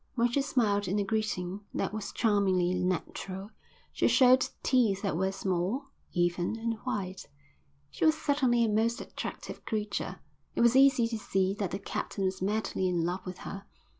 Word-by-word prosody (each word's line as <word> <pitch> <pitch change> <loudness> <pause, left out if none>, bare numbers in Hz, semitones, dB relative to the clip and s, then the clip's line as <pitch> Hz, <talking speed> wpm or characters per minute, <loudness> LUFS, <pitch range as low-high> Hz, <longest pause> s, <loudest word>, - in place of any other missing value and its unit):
When 240 -1 +2
she 280 - +2
smiled 210 -8 +1
in 195 +3 0
a 205 - +2
greeting 200 -3 -2
that - - -1
was 215 -2 -4
charmingly 190 -5 +2
natural, 185 +2 -3 0.4
she - - +2
showed 255 0 +5
teeth 225 -7 +2
that 195 -5 0
were 190 +3 +1
small, 195 - -2 0.2
even, 175 +3 0
and 230 0 -1
white. 195 -7 -4 0.6
She - - -1
was 315 0 +5
certainly 265 -6 +2
a - - +1
most 225 +2 +1
attractive - - -7
creature. 210 -2 -3 0.4
It - - +1
was 235 +1 +5
easy 270 -3 +6
to 230 -1 -4
see 190 -2 +1
that 195 -3 0
the 195 - -3
captain 195 0 -4
was 190 0 -1
madly 200 -1 0
in 175 -2 +1
love 180 +2 -2
with 180 0 -5
her. 195 0 -6
205 Hz, 170 wpm, -30 LUFS, 185-235 Hz, 0.6 s, easy